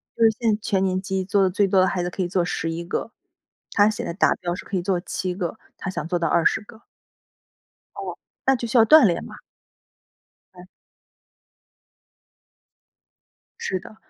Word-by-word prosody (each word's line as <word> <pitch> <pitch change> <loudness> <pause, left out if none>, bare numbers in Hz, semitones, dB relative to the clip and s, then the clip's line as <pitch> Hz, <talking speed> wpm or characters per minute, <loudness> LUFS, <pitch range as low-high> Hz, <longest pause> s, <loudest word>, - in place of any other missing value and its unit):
就 230 - +1
是 225 - +8
现 230 -3 +2
在 210 - -2
全 195 -2 0
年 185 -1 0
级 190 -1 -2
做 200 +1 +2
的 190 - +4
最 200 +2 +2
多 190 0 +3
的 185 - +4
孩 180 -2 -1
子 175 - -3
可 190 - -4
以 180 - 0
做 175 -1 0
11 165 -1 -3
个， 195 +5 -3 0.6
他 205 0 +4
现 215 - -4
在 - - -4
达 180 - +3
标 175 0 -3
是 180 - -7
可 195 - -2
以 175 - -2
做 185 -1 0
7 185 0 -3
个， 180 +2 -4 0.2
他 195 - -5
想 165 -4 -4
做 175 0 -1
到 165 - 0
20 170 +6 +2
个。 220 +1 -15 1.1
哦， - - -6 0.3
那 265 0 +5
就 240 - -4
需 235 - 0
要 225 - +7
锻 310 +4 +8
炼 175 - 0
嘛。 - - -11 1.2
嗯。 180 0 -13 2.9
是 185 - -2
的。 215 - -13
190 Hz, 185 characters per minute, -23 LUFS, 180-210 Hz, 2.9 s, 是